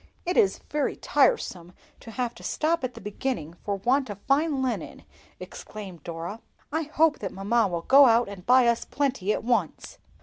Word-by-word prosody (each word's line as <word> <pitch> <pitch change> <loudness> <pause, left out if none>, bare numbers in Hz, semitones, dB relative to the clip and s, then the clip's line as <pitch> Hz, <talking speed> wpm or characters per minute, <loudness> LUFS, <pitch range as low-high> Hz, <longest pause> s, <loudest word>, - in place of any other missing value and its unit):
"It 355 +1 -1
is 195 - +3
very 295 -1 0
tiresome 180 - +1 0.3
to - - -12
have 240 +1 -3
to - - -15
stop 325 +1 -1
at 250 -1 -3
the - - -9
beginning 210 - -4
for 205 - -1
want 255 +6 +1
of 205 - -6
fine 280 +1 +1
linen!" 255 - -4 0.4
exclaimed 190 -7 -9
Dora. 170 +6 -6 0.3
"I 320 +2 0
hope 315 -1 +3
that 195 - -4
mamma 210 +3 +1
will 170 -2 -4
go 275 +5 +7
out 235 +1 +4
and 200 -3 -9
buy 250 +4 +5
us 235 0 +2
plenty 270 -8 -1
at - - -2
once." 225 -9 -2
235 Hz, 180 wpm, -26 LUFS, 195-275 Hz, 0.4 s, go